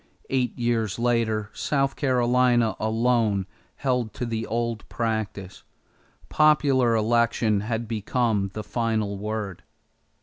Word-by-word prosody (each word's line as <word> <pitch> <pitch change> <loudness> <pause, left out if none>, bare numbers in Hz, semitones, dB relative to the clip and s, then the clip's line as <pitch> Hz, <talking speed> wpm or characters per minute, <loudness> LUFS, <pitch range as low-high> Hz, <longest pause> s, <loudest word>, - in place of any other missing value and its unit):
Eight 125 -3 0
years 115 -4 0
later 115 -3 0
South 135 +3 0
Carolina 125 -3 +2
alone 110 -3 +1 0.3
held 125 -5 -1
to 125 - -3
the 115 -1 -3
old 115 0 -3
practice. 110 -4 -3 0.7
Popular 140 -6 +3
election 115 -1 +2
had 115 +2 -3
become 110 -2 0
the 110 - -4
final 110 -3 -1
word. 105 -3 -4
115 Hz, 105 wpm, -25 LUFS, 110-120 Hz, 0.7 s, Popular